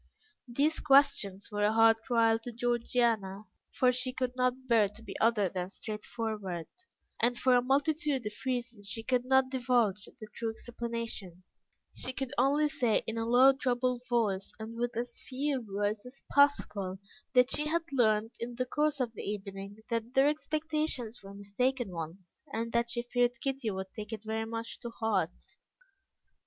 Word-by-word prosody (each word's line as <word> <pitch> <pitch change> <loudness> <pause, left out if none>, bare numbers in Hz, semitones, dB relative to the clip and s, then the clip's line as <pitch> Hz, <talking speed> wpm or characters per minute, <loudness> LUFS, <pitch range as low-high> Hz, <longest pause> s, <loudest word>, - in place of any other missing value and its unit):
These 285 +6 +1
questions 270 -9 +3
were 205 0 -1
a 210 +1 +3
hard 225 0 +6
trial 230 -2 +3
to 240 +2 -7
Georgiana, 230 -4 0 0.3
for 255 -1 +3
she 255 +1 -1
could 255 -1 -2
not 255 +1 0
bear 225 -4 +4
to 210 +3 -15
be - - -8
other 220 -3 +3
than 180 0 -3
straightforward, 210 -4 -4 0.6
and 240 +1 +2
for 255 +1 +3
a 245 - +5
multitude 280 0 +1
of 210 - -3
reasons 240 -5 -3
she 225 +2 -4
could 250 0 +1
not 265 0 +3
divulge 240 -6 +1
the 220 -4 -12
true 230 - -2
explanation; 230 -6 -5 0.5
she 255 - -1
could 265 0 -4
only 290 +3 +4
say 260 -8 +1
in 225 0 -3
a 225 - -2
low, 255 +3 +7
troubled 250 -2 0
voice, 210 -5 +1
and 220 +1 -7
with 240 0 -2
as 240 0 -4
few 275 0 -2
words 205 +1 -1
as 255 +2 -10
possible, 205 -10 +3 0.4
that 250 0 +5
she 300 - +2
had 335 +2 +1
learnt, 225 -3 +2
in 240 +1 -5
the 255 +1 -1
course 295 +2 0
of 240 -3 -1
the - - -7
evening, 200 +1 -6
that 230 +2 -2
their 270 +1 +6
expectations 305 -6 -2
were 195 0 -11
mistaken 235 +3 -1
ones, 170 +2 -8
and 230 -1 -2
that 235 0 +2
she 240 0 -1
feared 245 0 +1
Kitty 270 -4 -1
would 190 -1 -5
take 210 -1 -7
it 220 -1 -5
very 220 0 -2
much 230 0 -5
to 240 - -6
heart. 210 -7 -2
235 Hz, 170 wpm, -31 LUFS, 215-255 Hz, 0.6 s, low